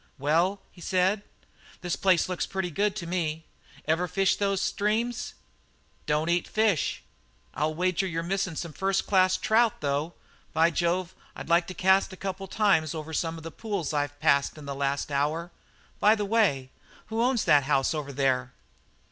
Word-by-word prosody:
"Well," 170 +8 +1
he 175 - -16
said, 190 +3 +1 0.6
"this 175 -2 -2
place 185 -4 +3
looks 185 -1 -2
pretty 190 -2 -3
good 205 +5 0
to 170 - -5
me. 165 -2 -2 0.4
Ever 165 +3 +1
fish 195 +3 +2
those 195 -1 0
streams?" 225 +5 -1 0.7
"Don't 150 +1 +1
eat 175 0 +1
fish." 215 -8 +1 0.5
"I'll 155 +3 -1
wager 185 +2 0
you're 165 -2 -3
missing 190 -1 -2
some 165 0 -5
first 195 +2 0
class 185 -2 +3
trout, 225 0 +2
though. 145 +3 -1 0.4
By 165 +2 +4
Jove, 175 +1 0 0.2
I'd - - -8
like 170 +1 +3
to 185 - -7
cast 190 +3 +3
a 190 - -10
couple 195 0 -4
of - - -15
times 185 -8 +2
over 160 0 -6
some 165 +1 -1
of 160 - -10
the 165 - -7
pools 200 -4 -3
I've 145 -1 -2
passed 140 +2 +2
in 150 - -10
the 140 - -4
last 140 +1 -2
hour! 155 +5 -1 0.5
By 215 +2 +5
the 210 -2 -2
way, 190 - +1 0.4
who 225 - +1
owns 245 -1 +1
that 145 -2 +5
house 135 0 +2
over 150 -2 -4
there?" 130 -2 0
175 Hz, 175 wpm, -27 LUFS, 150-195 Hz, 0.7 s, By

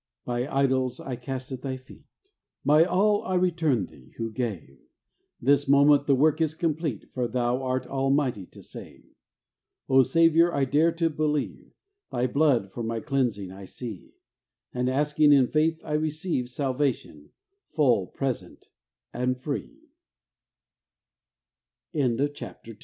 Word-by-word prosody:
My 125 +3 -2
idols 130 -2 +1
I 130 - -5
cast 130 +2 -6
at 130 - -5
Thy 130 -1 -4
feet, 130 0 -17 0.6
My 150 +3 +6
all 205 +3 +2
I 185 - -2
return 165 - +1
Thee 65 -6 -18
who 115 -1 -3
gave; 105 - -5 0.6
This 140 +3 +3
moment 140 +1 +5
the 140 - +5
work 155 +4 +3
is 155 -1 0
complete, 160 - -2
For 125 -2 -1
Thou 125 +1 0
art 130 0 -1
almighty 135 -7 0
to - - -15
save. - - -12 0.8
O 135 0 +6
Saviour, 165 +3 +4
I 140 - +2
dare 155 +5 +3
to 165 -1 0
believe, 150 -1 -2 0.4
Thy 125 0 0
Blood 130 -7 +2
for 120 - -6
my 115 0 -2
cleansing 110 -7 -1
I 95 +1 -10
see; 110 -2 -9 0.6
And, 125 0 0
asking 150 +2 +3
in 135 -2 +6
faith, 160 +4 +1
I 150 - -4
receive 155 -3 -1
Salvatio 130 - -2
135 Hz, 120 wpm, -26 LUFS, 125-155 Hz, 0.8 s, My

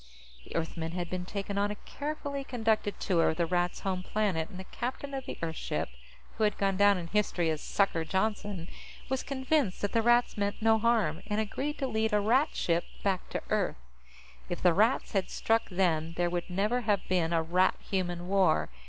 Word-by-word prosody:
The - - -10
Earthmen 165 0 -2
had 175 -1 -3
been 180 -1 -3
taken 200 +1 -3
on 205 +1 +2
a 210 - -3
carefully 285 +2 -5
conducted 220 -5 0
tour 175 -4 +2
of 160 - -2
the 170 - +2
Rats' 175 +1 0
home 185 -2 -1
planet, 185 -5 -1
and 185 - -9
the - - -5
captain 260 +7 -5
of 270 -1 -4
the - - -5
Earth 160 -1 -2
ship - - -2 0.5
who - - +2
had 210 - +2
gone 195 -1 +1
down 205 0 +5
in 175 - -4
history 175 -3 +1
as 155 - -3
"Sucker" 195 -5 +1
Johnston 190 0 -1 0.4
was 265 0 0
convinced 265 -5 0
that 205 - 0
the 230 - +3
Rats 240 -1 +3
meant 200 0 -1
no 220 0 +4
harm, 215 -8 +2
and 210 0 0
agreed 270 +7 -2
to 275 - -1
lead 220 -2 0
a 210 - +5
Rat 245 +8 +2
ship 170 0 +1 0.2
back 195 -2 0
to - - -3
Earth. - - +1 0.7
If 175 - -4
the 180 -2 +6
Rats 220 +8 +2
had 195 -3 0
struck 225 0 +1
then, 165 -4 +1
there 175 0 +1
would 175 0 -2
never 210 +7 +1
have 205 -4 0
been 175 -3 +1
a 165 -1 +2
Rat 180 +3 +3
Human 175 -2 -2
War. 185 - +3
200 Hz, 205 wpm, -30 LUFS, 175-220 Hz, 0.7 s, the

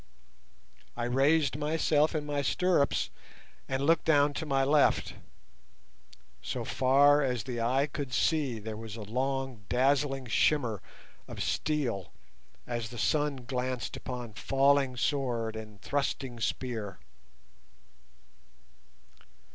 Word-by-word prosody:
I 120 - -2
raised 135 +3 +2
myself 155 0 +2
in 150 -1 -1
my 145 -1 -1
stirrups 160 +1 +1 0.6
and 135 +1 -1
looked 165 +2 +3
down 145 -2 +4
to 160 - -4
my 135 -1 +2
left; 145 +1 +3 1.3
so - - -4
far 140 +3 +4
as 125 -5 -1
the 120 -1 -4
eye 130 +4 +2
could 145 -2 -5
see 140 -2 +1
there 110 0 -6
was 110 -1 -7
a 110 - -7
long 130 +1 -2
dazzling 135 +1 +2
shimmer 120 -3 +1 0.5
of - - -5
steel 130 - -1 0.5
as 120 -2 -3
the 120 - -9
sun 145 +1 0
glanced 125 -1 -3
upon 125 -3 -6
falling 135 +2 +2
sword 120 -5 -1
and 110 -2 -9
thrusting 135 -3 -2
spear. 110 -4 -3
135 Hz, 115 wpm, -30 LUFS, 120-145 Hz, 1.3 s, down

